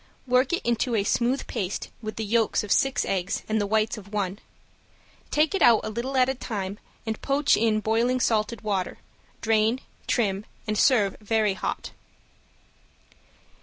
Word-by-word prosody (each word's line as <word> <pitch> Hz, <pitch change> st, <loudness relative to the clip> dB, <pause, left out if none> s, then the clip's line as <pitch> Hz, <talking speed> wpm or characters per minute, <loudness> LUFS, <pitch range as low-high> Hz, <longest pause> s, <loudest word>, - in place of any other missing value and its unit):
Work 255 Hz, +1 st, +3 dB
it 345 Hz, -, -1 dB
into 235 Hz, +1 st, +1 dB
a 205 Hz, -, +2 dB
smooth 245 Hz, +6 st, +1 dB
paste 190 Hz, 0 st, -3 dB
with 215 Hz, -1 st, -5 dB
the 220 Hz, -, -3 dB
yolks 225 Hz, 0 st, +2 dB
of 210 Hz, -, -6 dB
six 270 Hz, -1 st, +2 dB
eggs 190 Hz, -1 st, -1 dB
and 220 Hz, 0 st, +1 dB
the 205 Hz, -, -1 dB
whites 220 Hz, +1 st, +1 dB
of 200 Hz, -1 st, -14 dB
one. 200 Hz, -1 st, -2 dB, 0.9 s
Take 305 Hz, +3 st, +2 dB
it 390 Hz, -, -1 dB
out 235 Hz, -5 st, +6 dB
a -, -, -3 dB
little 250 Hz, +5 st, -3 dB
at 255 Hz, -1 st, +5 dB
a 265 Hz, -, +1 dB
time 205 Hz, -5 st, -5 dB, 0.3 s
and 220 Hz, -1 st, -3 dB
poach 280 Hz, +1 st, +3 dB
in 215 Hz, -1 st, +2 dB
boiling 230 Hz, +4 st, +1 dB
salted 220 Hz, -2 st, 0 dB
water, 200 Hz, -4 st, -2 dB, 0.4 s
drain, 225 Hz, +2 st, +2 dB, 0.3 s
trim, 205 Hz, -4 st, 0 dB, 0.2 s
and 215 Hz, -1 st, -1 dB
serve 210 Hz, -5 st, +3 dB
very 215 Hz, -1 st, +1 dB
hot. 190 Hz, -, -4 dB
220 Hz, 165 wpm, -26 LUFS, 210-245 Hz, 0.9 s, out